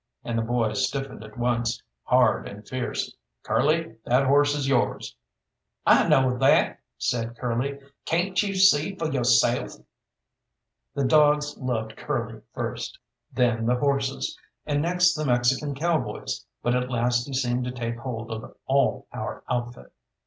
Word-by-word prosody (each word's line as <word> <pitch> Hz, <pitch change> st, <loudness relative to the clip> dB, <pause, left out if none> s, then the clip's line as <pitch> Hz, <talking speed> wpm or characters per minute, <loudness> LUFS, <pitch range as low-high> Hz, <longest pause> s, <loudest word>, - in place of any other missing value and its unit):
And 120 Hz, -, -3 dB
the 115 Hz, -, +1 dB
boy 115 Hz, -1 st, 0 dB
stiffened 135 Hz, +3 st, -2 dB
at 110 Hz, 0 st, -13 dB
once, 120 Hz, -1 st, 0 dB, 0.3 s
hard -, -, +3 dB
and 100 Hz, +1 st, -10 dB
fierce. 130 Hz, -2 st, -3 dB, 0.3 s
"Curly, 155 Hz, -6 st, +1 dB
that 130 Hz, +3 st, +3 dB
horse 145 Hz, +2 st, +4 dB
is 140 Hz, -2 st, -1 dB
yours." 130 Hz, -3 st, 0 dB, 0.7 s
"I -, -, +5 dB
know 130 Hz, -5 st, +3 dB
that!" 135 Hz, -, +4 dB, 0.2 s
said 115 Hz, -1 st, -2 dB
Curly; 125 Hz, +3 st, -2 dB, 0.3 s
"cayn't 180 Hz, +3 st, +1 dB
you 200 Hz, -2 st, -2 dB
see 190 Hz, -2 st, +4 dB
fo' 160 Hz, -4 st, -2 dB
yo'self?" 120 Hz, -2 st, +2 dB, 1.2 s
The 140 Hz, -1 st, 0 dB
dogs 150 Hz, +1 st, +4 dB
loved 115 Hz, -4 st, -3 dB
Curly -, -, -3 dB
first, -, -, -4 dB, 0.3 s
then 115 Hz, -2 st, +1 dB
the 125 Hz, -, +3 dB
horses, 135 Hz, +1 st, -1 dB, 0.3 s
and 145 Hz, -1 st, 0 dB
next 175 Hz, +1 st, +3 dB
the 155 Hz, -, -3 dB
Mexican 130 Hz, +2 st, +1 dB
cowboys, 160 Hz, +2 st, -2 dB, 0.2 s
but 120 Hz, -, +2 dB
at 125 Hz, 0 st, 0 dB
last 120 Hz, 0 st, +1 dB
he 140 Hz, -, -7 dB
seemed 125 Hz, -1 st, 0 dB
to 125 Hz, -, -3 dB
take 115 Hz, -2 st, -4 dB
hold 115 Hz, -3 st, -5 dB
of 110 Hz, +2 st, -7 dB
all 135 Hz, 0 st, +1 dB
our -, -, -5 dB
outfit. 120 Hz, -, -4 dB
125 Hz, 145 wpm, -25 LUFS, 120-145 Hz, 1.2 s, I